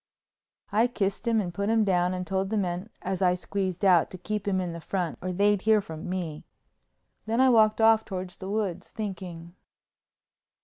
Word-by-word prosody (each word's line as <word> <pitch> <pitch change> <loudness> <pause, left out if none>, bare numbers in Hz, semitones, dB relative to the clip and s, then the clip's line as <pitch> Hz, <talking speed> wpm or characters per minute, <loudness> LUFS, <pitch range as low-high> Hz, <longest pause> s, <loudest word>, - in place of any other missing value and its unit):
I 220 +4 +3
kissed 205 -1 -2
him 230 -1 +3
and 180 -4 -3
put 200 +3 -1
him 225 -1 +3
down 180 -2 +1
and 180 0 -4
told 190 +1 -1
the 220 - 0
men 185 +1 -2
as 190 0 -2
I 180 -1 +4
squeezed 190 0 -3
out 180 -4 +5
to 185 - -8
keep 205 +3 -4
him 190 -2 +1
in 180 -2 -3
the 170 - -7
front 175 0 -3
or 185 +1 -3
they'd 200 +2 +2
hear 220 0 +4
from 160 -4 -7
me. 170 -5 -4 0.8
Then 225 +2 0
I 260 0 +6
walked 215 -2 +4
off 225 0 +5
toward 185 -3 -5
the 190 +2 -8
woods 195 -4 -2
thinking. 180 -5 -6
190 Hz, 190 wpm, -27 LUFS, 180-215 Hz, 0.8 s, I